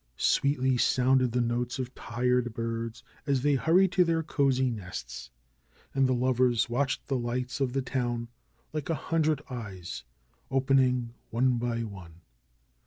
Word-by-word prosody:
Sweetly 130 -2 +2
sounded 130 0 +3
the 125 +1 +1
notes 120 +1 -1
of 130 -1 -4
tired 120 0 -1
birds 115 0 -4 0.2
as 135 -2 +1
they 145 0 +3
hurried 170 +7 +4
to 185 - +4
their 165 -1 +1
cosey 130 -4 +1
nests. 65 - -7 0.6
And 135 -1 +3
the 130 - +2
lovers 125 -1 +2
watched 135 +3 -1
the 135 -2 -1
lights 125 +3 -3
of 130 -2 0
the 135 -1 0
town, 120 -3 -2 0.5
like 155 -1 -4
a 165 - +2
hundred 155 -1 0
eyes, 100 -8 -6 0.5
opening 130 -3 +2 0.2
one 125 +1 +2
by 115 -1 -1
one. 90 -6 -10
125 Hz, 145 wpm, -29 LUFS, 120-135 Hz, 0.6 s, hurried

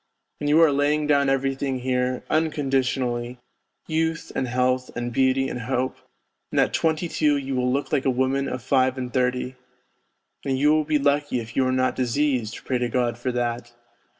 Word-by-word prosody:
And 145 - -1
you 155 +2 +5
are 160 - +5
laying 145 +2 +1
down 140 -2 +3
everything 135 0 0
here, 125 0 -1
unconditionally, 130 -5 0 0.5
youth 160 +1 -1
and 130 - -1
health 125 +1 0
and 120 0 -3
beauty 135 +1 +2
and 125 - -4
hope, 130 +2 -1 0.5
and - - 0
at - - +2
twenty 160 +1 +1
two 150 -3 +2
you 135 -1 -3
will 125 0 +1
look 140 +2 -2
like 140 -3 +1
a - - +3
woman 130 +2 0
of 130 -2 -5
five 130 -1 +2
and 125 -1 -5
thirty, 125 0 0 0.9
and 135 -1 -1
you 145 +3 +4
will 155 -1 +2
be 155 0 +2
lucky 145 -2 +1
if 115 0 -8
you 130 -1 +2
are - - +1
not 130 0 +1
diseased, 125 -3 -1
pray 125 -2 0
to 120 -1 -1
God 120 -1 0
for 125 +1 -1
that 120 0 -2
130 Hz, 185 wpm, -24 LUFS, 125-145 Hz, 0.9 s, you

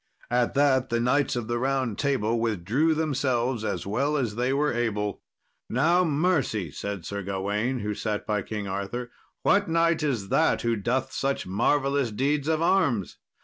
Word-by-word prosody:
At 120 +1 +1
that 135 -2 +3
the 115 - +1
Knights 135 +3 +2
of 120 -2 -2
the 120 0 -1
Round 130 -3 0
Table 120 -5 0
withdrew 115 - +1
themselves 130 -6 0
as - - -2
well 140 +9 0
as 120 -6 -1
they 125 +4 0
were 145 +2 +1
able. 105 -3 -1 0.5
"Now, 170 +9 +3
mercy," 145 - 0
said 100 +2 -5
Sir 100 +2 -4
Gawain, 105 +6 -2
who 105 +1 -2
sat 105 0 -3
by 105 -1 0
King 105 0 -5
Arthur; 100 +6 -4 0.3
"what 200 -1 +3
knight 165 0 +2
is 120 -10 -1
that - - +2
who 115 -1 +1
doth 125 +5 -1
such 135 0 -1
marvellous 135 +7 +1
deeds 140 +6 0
of 160 0 +1
arms? 155 - +1
125 Hz, 165 wpm, -26 LUFS, 105-145 Hz, 0.5 s, that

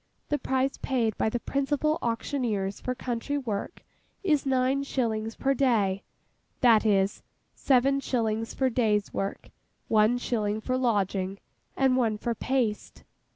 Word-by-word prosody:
The 295 - 0
price 265 +1 0
paid 235 -5 0
by - - +2
the 240 - -2
principal 290 +4 0
auctioneers 230 -4 -2
for 255 - -2
country 250 +3 -3
work 235 - -4 0.4
is 300 -7 +2
nine 260 +1 +2
shillings 225 -5 -2
per 275 0 +1
day; 215 -8 +2 0.6
that 225 -3 +5
is, 195 -1 +2 0.3
seven 275 +1 +3
shillings 225 -4 -1
for 260 -1 0
day's 215 -4 +1
work, 195 +1 -4 0.4
one 220 +2 +4
shilling 215 -4 -1
for 255 +3 -2
lodging, 200 -6 0 0.4
and 265 -1 +3
one 225 -4 +1
for 235 +2 -2
paste. 230 -3 -2
240 Hz, 135 wpm, -27 LUFS, 215-265 Hz, 0.6 s, that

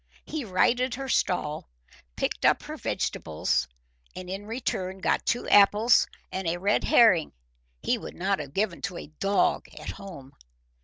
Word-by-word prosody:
He 310 -3 -4
righted 240 +6 +2
her 270 +1 -5
stall, 175 - -1 0.5
picked - - -2
up - - +4
her - - -6
vegetables, 65 - -1 0.5
and 185 0 -7
in 200 +2 -6
return 195 -5 -3
got 190 - 0
two 240 - 0
apples 210 +3 +5 0.2
and 190 -1 -3
a 165 +1 0
red 200 +3 +1
herring 185 -10 +5 0.5
he - - +1
would - - -9
not 195 +2 0
have 140 -2 -8
given 195 -3 -1
to 180 -2 -4
a - - -7
dog 200 0 +1
at - - -6
home. 155 -9 -11
195 Hz, 155 wpm, -27 LUFS, 180-220 Hz, 0.5 s, apples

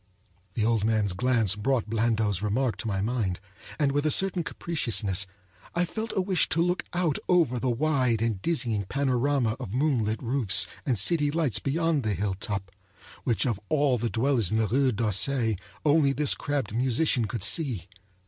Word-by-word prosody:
The 110 - 0
old 115 -2 +1
man's 105 -3 +1
glance 115 -2 +1
brought 120 +1 0
Blandot's 110 -3 0
remark 110 +4 0
to 125 - -5
my 100 -3 -1
mind, 105 -5 -1 0.4
and 145 -3 +1
with 145 +1 0
a 155 - +2
certain 185 +1 +1
capriciousness 100 - -2 0.5
I 175 +1 +2
felt 220 +5 -5
a 190 - +2
wish 185 -2 +1
to 160 - 0
look 180 +1 0
out 175 -4 0
over 165 -9 +3
the 130 - -1
wide 130 -3 +1
and 110 -4 -1
dizzying 120 - -1
panorama 130 -1 0
of 100 - -6
moonlit 125 -6 0
roofs 115 -6 +2 0.2
and 125 -4 +1
city 145 - +3
lights 150 -5 0
beyond 160 +1 0
the 110 -4 -1
hilltop, 95 0 -3 0.5
which 120 0 +1
of 115 -6 -1
all 140 -5 +2
the 120 +1 -1
dwellers 120 -4 +1
in 110 - 0
the 110 - +2
Rue 130 +5 +2
d'Auseil 115 +2 +1 0.3
only 145 -2 +4
this 150 0 +2
crabbed 140 -8 -3
musician 125 +1 +1
could 110 -2 -4
see. 110 - +2
120 Hz, 170 wpm, -27 LUFS, 110-145 Hz, 0.5 s, only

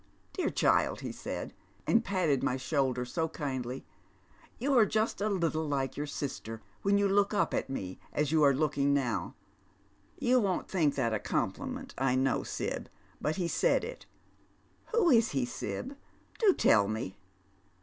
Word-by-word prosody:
* - - -37
Dear 370 - 0
child,' - - +2
he - - -4
said, - - -5 0.3
and 230 0 +3
patted 175 - +1
my 130 -2 0
shoulder 130 -2 0
so 160 +6 -1
kindly, 130 -5 -4 0.4
' - - -29
you 275 +3 +1
are 235 - +7
just 215 0 0
a 215 - +1
little 165 -5 0
like 135 -2 -1
your 145 +1 -3
Eister 130 -6 -5 0.2
when 200 0 +3
you 200 0 +3
look 200 +1 +2
up - - +1
at - - -1
me 95 -9 -5
as 150 -1 0
you 160 -1 +3
are 145 -1 +7
looking 140 -1 +2
now.' 130 -5 -1 0.8
You 250 0 +3
v/on't 190 -3 0
think 160 -7 +1
that 115 -4 0
a 110 - 0
compliment, - - -3
I 130 -1 +2
know, 130 -1 +2
Sib, - - -4 0.3
but 155 - 0
he 180 -3 -1
said - - +2
it. - - -7 0.8
Who 440 -8 +3
is 230 - +4
he, 135 -3 +1
Sib? 260 - -5 0.4
Do 430 -4 +6
tell 100 -2 +4
me." 110 -2 -4
150 Hz, 170 wpm, -31 LUFS, 130-200 Hz, 0.8 s, are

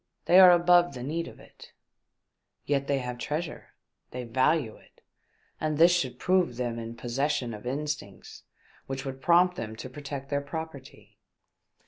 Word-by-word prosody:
They 180 - +6
are 185 -1 +10
above 175 -2 +4
the 125 - -6
need 165 +5 -3
of - - -12
it." - - -16 0.9
Yet 140 -1 0
they 140 - +1
have 125 -2 -5
treasure, 155 +6 -5 0.3
they 125 0 -6
value 130 +1 +1
it, - - -23 0.6
and 155 -1 -1
this 170 +2 +6
should 130 -8 -2
prove 180 -6 +1
them 120 -2 -3
in 115 0 -7
possession 125 0 -2
of 105 +3 -8
instincts 145 -7 -5 0.5
which 135 0 -4
Vvould 135 -1 -6
prompt 175 +4 +4
them 110 -1 -5
to 130 - -8
protect 140 0 -7
their 140 0 0
property." 145 -2 -9
140 Hz, 155 wpm, -28 LUFS, 125-160 Hz, 0.9 s, are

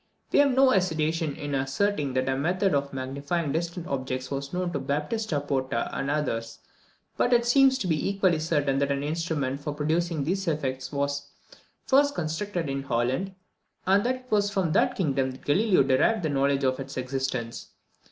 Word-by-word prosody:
We - - +4
have 280 -3 +4
no 265 0 +6
hesitation 160 - 0
in 145 -1 -5
asserting 140 +2 0
that 130 0 0
a 130 - +1
method 180 +6 +1
of 140 0 0
magnifying 140 +4 -2
distant 170 +2 -3
objects 130 -3 -3
was 140 0 -4
known 180 -1 -2
to 145 - -1
Baptista 150 +6 -1
Porta 130 -4 -2
and 135 - -2
others; 125 -6 -2 0.6
but 245 - +2
it 240 0 +4
seems 265 +2 +5
to 220 - -3
be 160 -1 0
equally 190 -5 +2
certain 145 -4 +1
that 140 0 +1
an 140 0 -1
instrument 150 -3 -2
for 145 0 -4
producing 160 +1 0
these 190 +5 -1
effects 135 -5 -2
was 140 0 -2 0.6
first 285 +2 +4
constructed 170 +1 -2
in 135 0 -2
Holland, 135 +9 -1 0.5
and 195 +2 +4
that 255 +1 +1
it 255 0 -15
was 205 -1 +3
from 190 -5 0
that - - +2
kingdom 135 -7 0
that 130 - -14
Galileo 190 +2 +4
derived 140 +10 +2
the 155 - 0
knowledge 140 0 +1
of 130 0 +1
its 135 0 -7
existence. 130 -2 -3
150 Hz, 180 wpm, -27 LUFS, 135-185 Hz, 0.6 s, no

